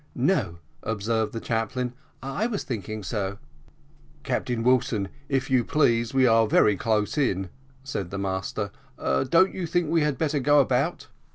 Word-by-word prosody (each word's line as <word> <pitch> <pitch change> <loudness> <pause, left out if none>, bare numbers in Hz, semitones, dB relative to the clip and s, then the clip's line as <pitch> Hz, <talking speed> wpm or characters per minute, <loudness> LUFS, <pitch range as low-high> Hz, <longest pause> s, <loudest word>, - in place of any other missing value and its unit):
"No," 130 - +1 0.2
observed 110 0 -1
the 115 - -4
chaplain, 120 +2 -2 0.3
"I 135 - -1
was 215 -5 -3
thinking 110 -3 -5
so." 100 -1 -3 0.9
"Captain 120 -2 -1
Wilson, 115 -5 +2 0.2
if 135 -1 -1
you 125 -2 +4
please, 115 -5 +2
we 130 -1 +4
are 115 -2 +5
very 105 -1 +4
close 110 +6 0
in," 95 -9 0 0.3
said 100 -9 -4
the 100 - -5
master: 95 +1 -3 0.3
"don't 170 +8 +2
you 180 -3 -3
think 170 -1 0
we 165 -1 +3
had 150 -3 0
better 150 -1 0
go 145 +2 +4
about?" 135 +5 +1
120 Hz, 155 wpm, -26 LUFS, 105-140 Hz, 0.9 s, are